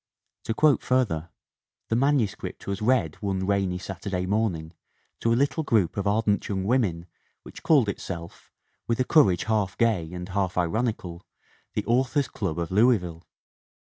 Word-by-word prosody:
To 115 Hz, -, -2 dB
quote 150 Hz, 0 st, +4 dB
further: 100 Hz, -11 st, 0 dB, 0.6 s
"The 115 Hz, -, +1 dB
manuscript 130 Hz, -5 st, 0 dB
was 100 Hz, +1 st, -3 dB
read 105 Hz, -9 st, +1 dB
one 95 Hz, -2 st, -1 dB
rainy 95 Hz, -2 st, 0 dB
Saturday 90 Hz, 0 st, -4 dB
morning 90 Hz, -6 st, -1 dB, 0.5 s
to 115 Hz, -, +1 dB
a -, -, +4 dB
little 140 Hz, +4 st, +1 dB
group 110 Hz, -, +1 dB
of 100 Hz, 0 st, -2 dB
ardent 105 Hz, 0 st, +1 dB
young 95 Hz, -2 st, -1 dB
women 100 Hz, -7 st, 0 dB, 0.4 s
which -, -, -11 dB
called 140 Hz, -9 st, +4 dB
itself, 85 Hz, -4 st, -6 dB, 0.4 s
with 115 Hz, +1 st, 0 dB
a -, -, +4 dB
courage 125 Hz, -, +4 dB
half 105 Hz, -3 st, -1 dB
gay 105 Hz, -9 st, +1 dB
and 90 Hz, 0 st, -6 dB
half 95 Hz, -1 st, -1 dB
ironical, 90 Hz, -1 st, -1 dB, 0.5 s
the -, -, -1 dB
Authors' 130 Hz, +4 st, +1 dB
Club 90 Hz, -7 st, -3 dB
of 85 Hz, 0 st, -3 dB
Louisville. 95 Hz, -6 st, +2 dB
100 Hz, 150 wpm, -26 LUFS, 90-115 Hz, 0.6 s, quote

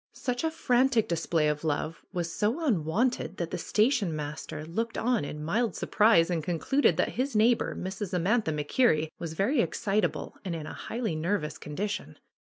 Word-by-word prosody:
Such 245 Hz, +1 st, -3 dB
a 320 Hz, -, +2 dB
frantic 255 Hz, -6 st, +2 dB
display 165 Hz, -2 st, +1 dB
of 150 Hz, 0 st, -1 dB
love 155 Hz, +1 st, -2 dB
was 175 Hz, -3 st, -3 dB
so 235 Hz, +11 st, 0 dB
unwonted 195 Hz, -, 0 dB
that 170 Hz, -1 st, -3 dB
the -, -, -3 dB
station 215 Hz, -, +2 dB
master 150 Hz, 0 st, -5 dB
looked 225 Hz, +8 st, -3 dB
on 240 Hz, -4 st, +1 dB
in 150 Hz, +1 st, -5 dB
mild 220 Hz, +8 st, 0 dB
surprise 205 Hz, -6 st, +4 dB
and 165 Hz, -3 st, -1 dB
concluded 180 Hz, -, +2 dB
that -, -, +2 dB
his 270 Hz, -1 st, 0 dB
neighbor, 225 Hz, +3 st, +3 dB
Mrs. 190 Hz, +1 st, -4 dB
Amantha 185 Hz, +2 st, +1 dB
MacKerrie, 155 Hz, -, +2 dB
was 165 Hz, -2 st, -4 dB
very 235 Hz, -, +2 dB
excitable 205 Hz, -5 st, -1 dB
and 180 Hz, -4 st, -3 dB
in 155 Hz, -2 st, -5 dB
a -, -, -7 dB
highly 225 Hz, -8 st, -3 dB
nervous 160 Hz, -1 st, -2 dB
condition. 200 Hz, +8 st, -4 dB
195 Hz, 165 wpm, -28 LUFS, 160-235 Hz, -, surprise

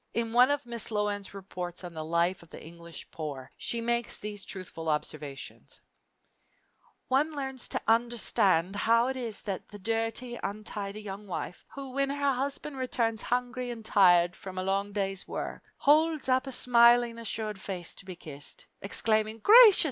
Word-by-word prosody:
In 230 Hz, 0 st, -1 dB
one 250 Hz, +2 st, +6 dB
of 290 Hz, -1 st, 0 dB
Miss 235 Hz, -2 st, -5 dB
Loane's 205 Hz, -2 st, -2 dB
reports 185 Hz, -2 st, -6 dB
on 175 Hz, -1 st, -7 dB
the 160 Hz, -1 st, -5 dB
life 170 Hz, +3 st, 0 dB
of 170 Hz, -, -17 dB
the -, -, -10 dB
English 170 Hz, 0 st, -11 dB
poor, 145 Hz, -5 st, -6 dB
she 235 Hz, -, -2 dB
makes 235 Hz, 0 st, 0 dB
these 205 Hz, -1 st, -6 dB
truthful 170 Hz, -4 st, -6 dB
observations: 150 Hz, -2 st, -5 dB, 1.3 s
One 290 Hz, +4 st, +2 dB
learns 265 Hz, -3 st, -4 dB
to -, -, -2 dB
understand 220 Hz, -6 st, +2 dB
how 230 Hz, +4 st, +3 dB
it 265 Hz, -, -2 dB
is 235 Hz, -5 st, -5 dB
that 195 Hz, -3 st, -4 dB
the 205 Hz, -, -10 dB
dirty, 225 Hz, +3 st, -2 dB
untidy 210 Hz, 0 st, -5 dB
young 200 Hz, 0 st, -7 dB
wife, 180 Hz, -1 st, -5 dB
who, 275 Hz, -2 st, -6 dB
when 275 Hz, +1 st, 0 dB
her 280 Hz, 0 st, +1 dB
husband 275 Hz, +2 st, -3 dB
returns 230 Hz, -3 st, -1 dB
hungry 250 Hz, 0 st, -2 dB
and 230 Hz, -2 st, -7 dB
tired 175 Hz, -4 st, +5 dB
from 190 Hz, -1 st, -9 dB
a 185 Hz, -, -1 dB
long 195 Hz, +2 st, -1 dB
day's 195 Hz, -1 st, -2 dB
work, -, -, -5 dB, 0.2 s
holds 310 Hz, 0 st, +3 dB
up 260 Hz, +1 st, +2 dB
a -, -, -4 dB
smilingly 235 Hz, -1 st, +5 dB
assured 215 Hz, -3 st, -4 dB
face 180 Hz, -4 st, -5 dB
to -, -, -12 dB
be 185 Hz, -1 st, -7 dB
kissed, 145 Hz, -4 st, -5 dB, 0.2 s
exclaiming, 215 Hz, +2 st, +2 dB
"Gracious! 435 Hz, -, +8 dB
215 Hz, 165 wpm, -29 LUFS, 190-245 Hz, 1.3 s, Gracious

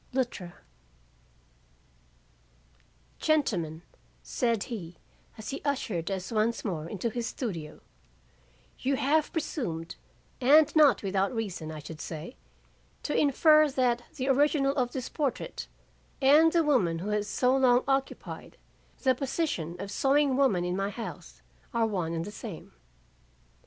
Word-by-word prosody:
LUTTRA 240 Hz, -9 st, -2 dB, 2.6 s
"Gentlemen," 175 Hz, -, 0 dB, 0.4 s
said 230 Hz, -5 st, 0 dB
he 175 Hz, -8 st, -7 dB, 0.4 s
as 220 Hz, -, -7 dB
he 275 Hz, -, -5 dB
ushered 220 Hz, -, -2 dB
us 190 Hz, +1 st, -4 dB
once 225 Hz, +1 st, 0 dB
more 165 Hz, -5 st, -3 dB
into 215 Hz, +4 st, -3 dB
his 235 Hz, 0 st, -3 dB
studio, 165 Hz, -, -5 dB, 1.0 s
"you 275 Hz, +1 st, +1 dB
have 300 Hz, +4 st, +1 dB
presumed, 180 Hz, -, -4 dB, 0.4 s
and 295 Hz, +4 st, +6 dB
not 295 Hz, -7 st, +5 dB
without 195 Hz, 0 st, 0 dB
reason 185 Hz, -8 st, -4 dB
I 155 Hz, -, -7 dB
should 155 Hz, +1 st, -9 dB
say, 165 Hz, -, -7 dB, 0.7 s
to 295 Hz, -, -2 dB
infer 305 Hz, +1 st, +5 dB
that 250 Hz, -3 st, +1 dB
the 260 Hz, -2 st, -3 dB
original 275 Hz, 0 st, +3 dB
of 250 Hz, -3 st, 0 dB
this 255 Hz, -2 st, -4 dB
portrait 275 Hz, -, -3 dB, 0.5 s
and 300 Hz, +4 st, +6 dB
the 335 Hz, -1 st, +3 dB
woman 220 Hz, -, +2 dB
who 185 Hz, +5 st, -4 dB
has 210 Hz, 0 st, 0 dB
so 250 Hz, +5 st, +2 dB
long 255 Hz, -2 st, +4 dB
occupied 270 Hz, 0 st, -3 dB, 0.5 s
the 260 Hz, -1 st, +5 dB
position 255 Hz, -, -2 dB
of 200 Hz, +1 st, -5 dB
sewing 275 Hz, +1 st, +2 dB
woman 220 Hz, -11 st, +2 dB
in 180 Hz, 0 st, -1 dB
my 195 Hz, +1 st, -1 dB
house, 225 Hz, +2 st, -8 dB, 0.3 s
are 230 Hz, -1 st, +3 dB
one 180 Hz, -7 st, -2 dB
and 165 Hz, 0 st, -2 dB
the 210 Hz, -, -7 dB
same. 210 Hz, -, -9 dB
235 Hz, 130 wpm, -29 LUFS, 180-275 Hz, 2.6 s, and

